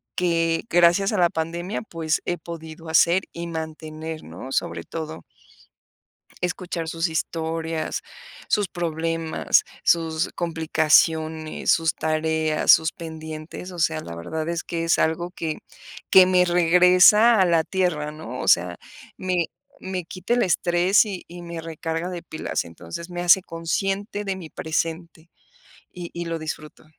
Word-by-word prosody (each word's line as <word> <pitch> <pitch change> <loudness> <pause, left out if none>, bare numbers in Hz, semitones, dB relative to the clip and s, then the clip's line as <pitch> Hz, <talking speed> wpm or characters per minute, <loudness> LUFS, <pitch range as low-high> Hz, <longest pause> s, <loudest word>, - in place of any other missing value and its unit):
que 165 -2 +1
gracias 175 +4 +4
a - - 0
la 175 -1 +5
pandemia, 170 +5 -3
pues 165 -5 -2
he 175 - -1
podido 160 -1 -9
hacer 170 +3 +4
y 170 0 -5
mantener, 160 -1 -6
¿no?, 130 - -9
sobre 85 -7 -1
todo 160 -1 -6 1.2
escuchar 180 -2 -3
sus 165 +1 -1
historias, 160 0 -2 0.5
sus 205 -1 +2
problemas, 165 -2 0 0.2
sus 165 -1 +2
complicaciones, 160 -1 +1
sus 165 -1 +3
tareas, 155 0 +2
sus 160 0 +4
pendientes, 160 +1 -8
o 175 - -9
sea, 110 - +1
la 85 +1 -8
verdad 155 - -4
es 170 0 -2
que 165 -1 -3
es 165 - +2
algo 170 +2 0
que 160 -4 -4 0.5
que 190 -1 +8
me 180 -1 +4
regresa 180 +6 +6
a - - +5
la 165 -2 +3
tierra, 170 -6 -1
¿no?, 130 -5 -7
o - - -3
sea, 90 0 +3 0.4
me 180 -3 0 0.4
me 185 -2 -4
quita 185 +7 -2
el 245 - +2
estrés 175 +3 +3
y 200 -4 -6
y 175 +1 -10
me 170 -1 -6
recarga 165 +1 -4
de 175 -2 -6
pilas, 160 - -3
entonces 85 - -9
me 175 - -4
hace 180 +2 +6
consciente 195 +4 -2
de 195 -1 -2
mi 170 -4 -8
presente 165 +1 -3 0.6
y 175 -1 -8
y 170 0 -4
lo 165 0 -2
disfruto. 155 -1 -7
165 Hz, 145 wpm, -24 LUFS, 160-175 Hz, 1.2 s, que